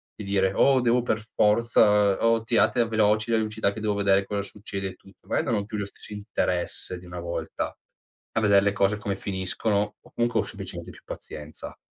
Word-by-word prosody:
di 105 Hz, -, -8 dB
dire: 95 Hz, -1 st, +1 dB
"Oh, 135 Hz, -1 st, +4 dB
devo 125 Hz, 0 st, +3 dB
per 115 Hz, -2 st, 0 dB, 0.2 s
forza, 105 Hz, -2 st, +4 dB
oh, 115 Hz, -1 st, +3 dB
tirate 115 Hz, +1 st, +3 dB
veloci 110 Hz, 0 st, +2 dB
le 110 Hz, -, +3 dB
pubblicità 110 Hz, -2 st, 0 dB
che 110 Hz, -, -7 dB
devo 105 Hz, -1 st, +1 dB
vedere 100 Hz, -1 st, +3 dB
cosa 100 Hz, 0 st, -2 dB
succede 100 Hz, -1 st, -5 dB
e 95 Hz, -, -7 dB
tutto". 95 Hz, -, -21 dB
Magari -, -, +1 dB
non 115 Hz, -, +2 dB
ho 100 Hz, -1 st, -1 dB
più 105 Hz, -, -7 dB
lo 100 Hz, -, -1 dB
stesso 100 Hz, +1 st, -10 dB
interesse 90 Hz, -3 st, -2 dB
di 90 Hz, -, -13 dB
una 90 Hz, 0 st, -7 dB
volta 85 Hz, -1 st, -4 dB, 0.6 s
a -, -, +4 dB
vedere 100 Hz, -2 st, +5 dB
le 100 Hz, -, +3 dB
cose 100 Hz, +1 st, +2 dB
come 105 Hz, -2 st, -3 dB
finiscono 100 Hz, +2 st, -1 dB
o -, -, -20 dB
comunque 120 Hz, +1 st, +1 dB
ho -, -, 0 dB
semplicemente -, -, -7 dB
più -, -, -14 dB
pazienza. 75 Hz, 0 st, -8 dB
105 Hz, 200 wpm, -26 LUFS, 95-110 Hz, 0.6 s, vedere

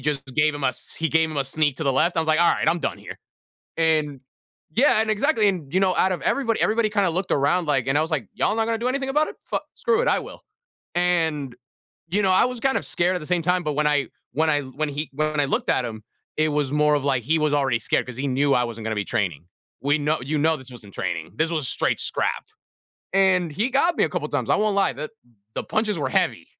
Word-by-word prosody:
just 145 Hz, -2 st, -2 dB
gave 150 Hz, 0 st, +3 dB
him 145 Hz, -1 st, -5 dB
a -, -, +4 dB
s -, -, -7 dB
he 160 Hz, -, -1 dB
gave 160 Hz, 0 st, +2 dB
him 155 Hz, -, -6 dB
a 140 Hz, -, +1 dB
sneak 145 Hz, 0 st, 0 dB
to 160 Hz, -, -4 dB
the 135 Hz, -, +2 dB
left. 170 Hz, +7 st, +1 dB
I -, -, +3 dB
was 160 Hz, -, -2 dB
like, 155 Hz, +2 st, +3 dB
"All 175 Hz, -, +5 dB
right, -, -, -2 dB
I'm 170 Hz, -, +1 dB
done -, -, -2 dB
here," -, -, -10 dB, 0.6 s
and 155 Hz, -4 st, +2 dB, 0.5 s
yeah, 240 Hz, -4 st, +4 dB
and 220 Hz, -, -2 dB
exactly, 215 Hz, 0 st, +2 dB
and, 170 Hz, -8 st, -3 dB
you 185 Hz, -, +2 dB
know, 190 Hz, -2 st, +2 dB
out 190 Hz, -, +2 dB
of 180 Hz, -, -4 dB
everybody 235 Hz, -5 st, 0 dB
everybody 220 Hz, 0 st, +2 dB
kind 205 Hz, -2 st, +1 dB
of 165 Hz, -, -1 dB
looked 185 Hz, +1 st, -2 dB
around, 160 Hz, +5 st, +2 dB
like 135 Hz, -4 st, +1 dB
and 135 Hz, +2 st, +1 dB
I -, -, +4 dB
was 160 Hz, +2 st, -2 dB
like, 135 Hz, -, -2 dB
"Y'all 215 Hz, -, 0 dB
not 225 Hz, -, +2 dB
gonna 225 Hz, 0 st, -1 dB
do 240 Hz, -, -1 dB
anything 270 Hz, +1 st, -1 dB
about 300 Hz, +3 st, +2 dB
it? -, -, -9 dB
Fuck -, -, -3 dB
screw 465 Hz, -2 st, +1 dB
it, -, -, +1 dB
I -, -, +3 dB
will," -, -, -9 dB, 0.5 s
and, 160 Hz, -7 st, +1 dB, 0.5 s
you 200 Hz, +5 st, +1 dB
know, 190 Hz, -, +2 dB
I 185 Hz, -, +5 dB
was 250 Hz, -1 st, -3 dB
kind 270 Hz, +2 st, +1 dB
of -, -, -2 dB
scared 180 Hz, +2 st, +1 dB
at -, -, -1 dB
the 150 Hz, -, -9 dB
same 175 Hz, 0 st, 0 dB
time, 180 Hz, +1 st, +1 dB
but 150 Hz, -, -1 dB
when 150 Hz, +1 st, +1 dB
I 145 Hz, -3 st, +1 dB, 0.3 s
when 160 Hz, +2 st, +1 dB
I 145 Hz, -1 st, +2 dB
when 140 Hz, +3 st, -4 dB
he 145 Hz, +2 st, -4 dB
when 155 Hz, +1 st, -1 dB
I 140 Hz, -, +2 dB
looked -, -, -1 dB
at 125 Hz, -, +1 dB
him, 110 Hz, -2 st, -6 dB, 0.3 s
it 155 Hz, 0 st, +2 dB
was 145 Hz, -3 st, 0 dB
more 150 Hz, 0 st, +3 dB
of 145 Hz, -2 st, -1 dB
like 135 Hz, -3 st, +1 dB
he 160 Hz, +7 st, +1 dB
was 155 Hz, -1 st, +1 dB
already 135 Hz, -4 st, +1 dB
scared -, -, 0 dB
'cause 125 Hz, -, -8 dB
he 135 Hz, +2 st, -2 dB
knew 140 Hz, +1 st, +2 dB
I 125 Hz, -, +2 dB
wasn't 115 Hz, -2 st, -6 dB
gonna 110 Hz, -, -2 dB
be 100 Hz, -, -1 dB
training. 90 Hz, -8 st, -2 dB, 0.3 s
We 145 Hz, +4 st, +1 dB
know 150 Hz, +1 st, 0 dB
you 140 Hz, +5 st, -3 dB
know 160 Hz, +2 st, +2 dB
this 130 Hz, -2 st, -12 dB
wasn't 110 Hz, -5 st, -12 dB
training, 85 Hz, -3 st, -4 dB
this 160 Hz, +4 st, +1 dB
was 155 Hz, -5 st, -1 dB
straight -, -, 0 dB
scrap, -, -, -1 dB, 0.7 s
and 185 Hz, -3 st, +3 dB
he 215 Hz, -, 0 dB
got 335 Hz, +7 st, +2 dB
me -, -, +3 dB
a -, -, 0 dB
couple -, -, -3 dB
of -, -, -15 dB
times, -, -, -1 dB
I -, -, +5 dB
won't 210 Hz, -1 st, +1 dB
lie. 200 Hz, -, +2 dB
The 150 Hz, +7 st, -6 dB, 0.4 s
the -, -, -3 dB
punches 215 Hz, -1 st, -1 dB
were -, -, -1 dB
heavy. -, -, 0 dB
155 Hz, 275 wpm, -23 LUFS, 140-185 Hz, 0.7 s, All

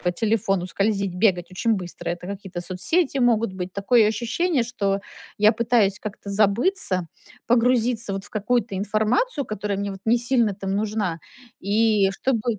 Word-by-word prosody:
по 180 Hz, 0 st, 0 dB
телефону 195 Hz, -3 st, 0 dB
скользить, 195 Hz, -1 st, -1 dB
бегать 180 Hz, -3 st, +2 dB
очень 225 Hz, +4 st, 0 dB
быстро. 180 Hz, -3 st, -5 dB
Это 175 Hz, +1 st, -5 dB
какие-то 195 Hz, -3 st, -6 dB
соцсети 265 Hz, -, -1 dB
могут 230 Hz, -4 st, +2 dB
быть. 185 Hz, -1 st, -6 dB
Такое 210 Hz, +3 st, +3 dB
ощущение, 245 Hz, -, 0 dB
что 200 Hz, -5 st, -1 dB, 0.4 s
я 210 Hz, +1 st, +5 dB
пытаюсь 225 Hz, -4 st, +2 dB
как-то 205 Hz, -1 st, -7 dB
забыться, 200 Hz, -, +1 dB, 0.4 s
погрузиться, 235 Hz, -2 st, +2 dB
вот, 195 Hz, 0 st, -4 dB
в -, -, -15 dB
какую-то 220 Hz, 0 st, -1 dB
информацию, 220 Hz, -, 0 dB
которая 210 Hz, -2 st, -3 dB
мне 200 Hz, 0 st, -2 dB
вот 195 Hz, -, -8 dB
не 230 Hz, +2 st, +4 dB
сильно 235 Hz, -3 st, +1 dB
там 195 Hz, 0 st, -3 dB
нужна. 205 Hz, -5 st, -1 dB, 0.4 s
И 210 Hz, -1 st, +2 dB
чтобы 230 Hz, -1 st, -1 dB
210 Hz, 155 wpm, -23 LUFS, 195-235 Hz, 0.4 s, я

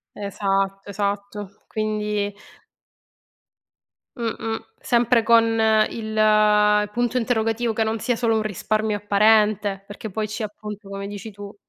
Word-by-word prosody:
Esatto, 195 Hz, -1 st, -2 dB
esatto; 200 Hz, 0 st, -3 dB, 0.2 s
quindi 210 Hz, -1 st, -2 dB, 1.8 s
Mh-mh, 225 Hz, -1 st, -3 dB, 0.2 s
sempre 235 Hz, -1 st, +3 dB
con 230 Hz, 0 st, +6 dB, 0.5 s
il 215 Hz, -1 st, +3 dB
punto 240 Hz, +2 st, 0 dB
interrogativo, 225 Hz, -1 st, 0 dB
che 225 Hz, -, +1 dB
non 220 Hz, +1 st, -1 dB
sia 245 Hz, -, 0 dB
solo 225 Hz, -2 st, +1 dB
un 220 Hz, -, +1 dB
risparmio 215 Hz, +1 st, -1 dB
apparente, 210 Hz, -1 st, +3 dB
perché 210 Hz, +2 st, -7 dB
poi 215 Hz, +2 st, -3 dB
ci 210 Hz, +1 st, -5 dB
appunto, 210 Hz, -1 st, -8 dB
come 200 Hz, 0 st, -5 dB
dici 205 Hz, +2 st, -7 dB
tu. 205 Hz, 0 st, -10 dB
210 Hz, 120 wpm, -23 LUFS, 205-225 Hz, 1.8 s, con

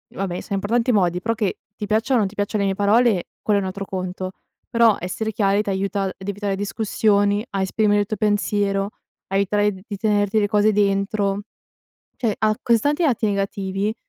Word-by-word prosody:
vabbè, 185 Hz, -2 st, -3 dB
siam 200 Hz, -, -3 dB
parlanti 230 Hz, +5 st, +1 dB
di 220 Hz, -, +3 dB
modi, 180 Hz, -2 st, +1 dB
però, 230 Hz, +4 st, 0 dB
che 210 Hz, -3 st, -2 dB, 0.2 s
ti 210 Hz, -, -5 dB
piacciano 220 Hz, +5 st, +2 dB
o -, -, +3 dB
non 205 Hz, -, +2 dB
ti 195 Hz, -, -11 dB
piacciano 205 Hz, +1 st, -1 dB
le 195 Hz, -, +1 dB
mie 195 Hz, -, -1 dB
parole 205 Hz, -1 st, +3 dB
quello 205 Hz, -1 st, +2 dB
è -, -, -2 dB
un -, -, -2 dB
altro 195 Hz, +1 st, -5 dB
conto. 185 Hz, 0 st, -4 dB, 0.4 s
Però 230 Hz, -2 st, +4 dB
essere 220 Hz, +5 st, -3 dB
chiari 205 Hz, -1 st, +2 dB
ti 205 Hz, -, -4 dB
aiuta 195 Hz, +1 st, -1 dB
a 190 Hz, -, -2 dB
evitare 200 Hz, 0 st, -3 dB
discussioni, 205 Hz, 0 st, +1 dB
a 195 Hz, -, -2 dB
esprimere 205 Hz, +2 st, +2 dB
il -, -, -1 dB
tuo 215 Hz, +1 st, -4 dB
pensiero, 205 Hz, -1 st, 0 dB, 0.4 s
a 195 Hz, -, -4 dB
evitare 205 Hz, +1 st, +2 dB
di 200 Hz, +2 st, -8 dB
tenerti 205 Hz, 0 st, +1 dB
le 205 Hz, -, +2 dB
cose 210 Hz, 0 st, +3 dB
dentro, 200 Hz, 0 st, +1 dB, 0.8 s
cioè 225 Hz, -5 st, 0 dB
ha 215 Hz, 0 st, +1 dB
così 235 Hz, -1 st, +3 dB
tanti 295 Hz, +7 st, +1 dB
lati 240 Hz, -7 st, +2 dB
negativi 195 Hz, 0 st, -1 dB
205 Hz, 200 wpm, -22 LUFS, 195-215 Hz, 0.8 s, Però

